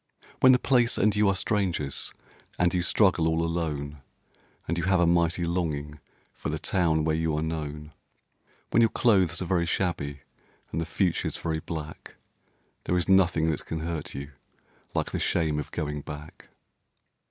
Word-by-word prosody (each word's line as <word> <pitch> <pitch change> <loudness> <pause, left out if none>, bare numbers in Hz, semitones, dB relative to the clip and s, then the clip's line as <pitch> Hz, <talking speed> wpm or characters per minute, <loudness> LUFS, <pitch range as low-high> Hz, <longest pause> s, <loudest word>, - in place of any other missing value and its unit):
When 130 - +7
the 125 - +6
place 125 -2 +3
and 105 +1 +3
you 105 0 +3
are 100 - +2
strangers 90 -9 -1 0.5
and 90 0 +2
you 90 - +1
struggle 90 -3 +3
all 80 0 +1
alone, 75 -4 -3 0.7
And 85 - 0
you 85 - -1
have 95 -1 +3
a 85 - +4
mighty 85 0 +2
longing 75 -4 -2 0.3
for - - -5
the - - -2
town 80 -4 +1
where 80 0 +1
you 80 -1 0
are 75 - -1
known; 75 -2 -5 0.8
When 115 - +4
your 115 - +5
clothes 95 -8 +2
are - - -4
very 85 -1 +1
shabby 75 -7 -2 0.5
and 80 - -2
the 80 - -3
future's 85 +1 0
very 80 -1 -2
black, 80 -1 -7 0.7
There 90 - +1
is 90 - 0
nothing 85 -4 +4
that 75 - -4
can 80 -1 -3
hurt 80 -1 -4
you 70 +1 -6 0.6
like - - -1
the - - -2
shame 80 -3 +1
of 75 - -5
going 75 -1 -3
back. 75 +1 -10
85 Hz, 170 wpm, -27 LUFS, 75-90 Hz, 0.8 s, When